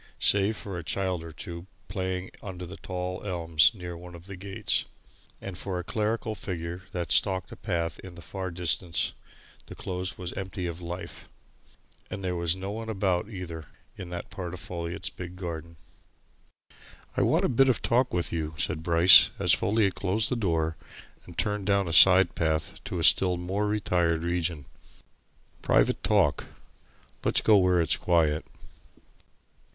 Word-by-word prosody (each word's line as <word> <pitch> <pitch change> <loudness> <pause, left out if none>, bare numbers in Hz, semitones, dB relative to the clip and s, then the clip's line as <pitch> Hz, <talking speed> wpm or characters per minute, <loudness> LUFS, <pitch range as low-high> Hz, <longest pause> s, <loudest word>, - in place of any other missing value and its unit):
Save 100 +2 +3
for 95 -4 -6
a - - -7
child 90 0 -1
or 85 - -9
two, 85 +3 -8 0.2
playing 95 -1 -3
under 90 -2 -7
the 90 +3 -9
tall 90 -1 -5
elms 85 -5 +3
near 90 -3 -7
one 90 +1 -11
of 85 0 -13
the 100 0 -8
gates, 95 +1 -1 0.5
and 95 -2 -7
for 95 +1 -4
a 90 - -3
clerical 110 +3 -2
figure 90 -3 -5
that 85 -2 -4
stalked 95 -2 +2
a - - -8
path 85 -3 -3
in 95 -2 -11
the 85 - -11
far 95 0 -5
distance, 85 -1 +1 0.5
the - - -9
Close 90 0 -4
was 90 -2 -5
empty 95 -1 -5
of 85 0 -5
life. 90 +1 -7 0.8
And 100 - -6
there 90 -1 -1
was 85 0 +1
no 95 +1 -5
one 110 +1 -6
about, 95 -2 0
either, 85 -6 -7 0.3
in 90 - -8
that 90 0 -7
part 90 -2 -5
of - - -9
Folliot's 85 0 -5
big 90 0 -8
garden. 85 -2 -6 1.4
"I - - +1
want - - +2
a - - +3
bit 135 +2 +4
of 130 - 0
talk 125 +2 +2
with 90 -1 -1
you," 80 -1 -3
said 80 0 -1
Bryce 85 +2 +8
as - - +4
Folliot 105 -2 +2
closed 100 +4 0
the 125 - 0
door 80 -7 0 0.5
and 85 - -12
turned 105 -2 -1
down 100 -2 +2
a 85 - -3
side 90 +1 +7
path 80 -1 -2
to - - -4
a - - -2
still 90 -2 +5
more 95 +4 -2
retired 90 -6 0
region. 85 -4 -2 1.0
"Private - - +2
talk. - - +2 0.8
Let's - - +3
go 105 - +5
where 90 -2 +3
it's 85 -1 +3
quiet." 80 -3 +2
90 Hz, 165 wpm, -27 LUFS, 85-95 Hz, 1.4 s, Bryce